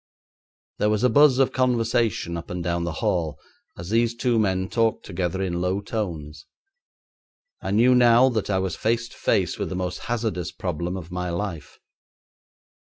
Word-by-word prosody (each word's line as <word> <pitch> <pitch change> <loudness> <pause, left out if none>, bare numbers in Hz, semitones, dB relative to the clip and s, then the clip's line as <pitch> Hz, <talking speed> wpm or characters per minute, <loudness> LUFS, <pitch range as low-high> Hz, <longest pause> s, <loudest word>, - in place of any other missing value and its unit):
There 105 - +2
was 105 +2 0
a 125 - +4
buzz 145 +1 +6
of 135 -1 +3
conversation 115 -7 +1
up 85 - -7
and 90 -1 -4
down 85 0 -1
the 85 - -2
hall 80 -4 0 0.4
as 85 +3 -7
these 115 +1 +2
two 120 -1 +1
men 95 -3 +1
talked 115 +2 0
together 95 +1 -2
in 90 -2 -2
low 90 +2 0
tones. 80 -8 -5 1.1
I - - -4
knew 115 +6 +4
now 120 0 +6
that 110 -5 -2
I 95 - +1
was 95 -2 -1
face 115 +1 0
to - - -15
face - - 0
with - - -2
the 95 - -4
most 90 0 -3
hazardous 110 -8 -2
problem 90 +1 -3
of 85 -1 -9
my 90 0 -3
life. 85 -4 -5
95 Hz, 175 wpm, -24 LUFS, 90-115 Hz, 1.1 s, buzz